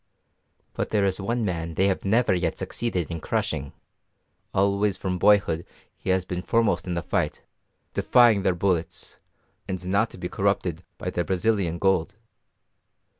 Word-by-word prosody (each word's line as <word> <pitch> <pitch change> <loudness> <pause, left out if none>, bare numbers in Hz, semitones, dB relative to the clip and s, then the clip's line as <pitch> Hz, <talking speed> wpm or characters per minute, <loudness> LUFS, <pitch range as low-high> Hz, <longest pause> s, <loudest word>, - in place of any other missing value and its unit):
But - - -2
there 105 -2 +2
is 95 0 0
one 115 +3 -1
man 85 -3 -3
they 95 - +3
have 95 -1 0
never 110 +2 +3
yet 90 -2 -1
succeeded 90 -9 -2
in 85 -1 -4
crushing: 70 -2 -2 0.8
always 100 0 +2
from 90 -2 -2
boyhood 90 -5 +4 0.3
he - - -7
has 95 -1 +2
been 90 -1 -3
foremost 115 +1 +1
in 90 - -2
the 85 - -2
fight, - - -1 0.5
defying 120 -5 +5
their 95 -1 +1
bullets, 90 -2 -2 0.5
and 95 -1 -4
not 100 +5 +2
to - - -12
be 90 - -4
corrupted 90 -4 -1
by - - -4
their 85 - -1
Brazilian 95 -2 0
gold. 95 -1 +1
95 Hz, 155 wpm, -25 LUFS, 85-100 Hz, 0.8 s, defying